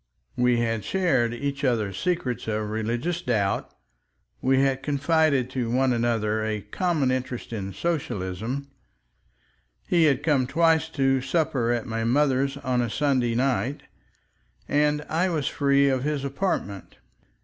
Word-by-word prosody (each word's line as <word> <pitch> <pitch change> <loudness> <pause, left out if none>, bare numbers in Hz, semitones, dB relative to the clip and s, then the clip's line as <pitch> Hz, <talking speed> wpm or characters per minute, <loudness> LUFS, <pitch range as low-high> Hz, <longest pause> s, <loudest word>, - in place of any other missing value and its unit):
We 125 0 +3
had 115 -2 -1
shared 150 - +1
each 140 +3 -4
other's 110 -7 0
secret 150 - -2
of 105 -1 -2
religious 120 +11 -2
doubt, 105 - -1 0.7
we 130 +1 +3
had 135 -1 +1
confided 140 -1 +2
to 125 -3 -2
one 130 +1 +2
another 110 -2 0
a 110 -1 -2
common 145 - 0
interest 130 -2 -4
in 100 -3 -4
Socialism, 120 - -3 1.2
he 170 -2 +4
had 140 -2 +2
come 140 -5 +2
twice 160 +2 +2
to 135 -1 +2
supper 135 -4 0
at 120 -2 -1
my 115 -2 -3
mother's 135 +2 +2
on 130 -3 0
a 120 - -1
Sunday 130 -3 +1
night, 130 +1 0 0.8
and 150 0 +1
I 175 +4 +1
was 155 -6 -1
free 140 0 +3
of 130 -2 +1
his 145 -2 -1
apartment. 140 - -3
130 Hz, 140 wpm, -25 LUFS, 115-145 Hz, 1.2 s, he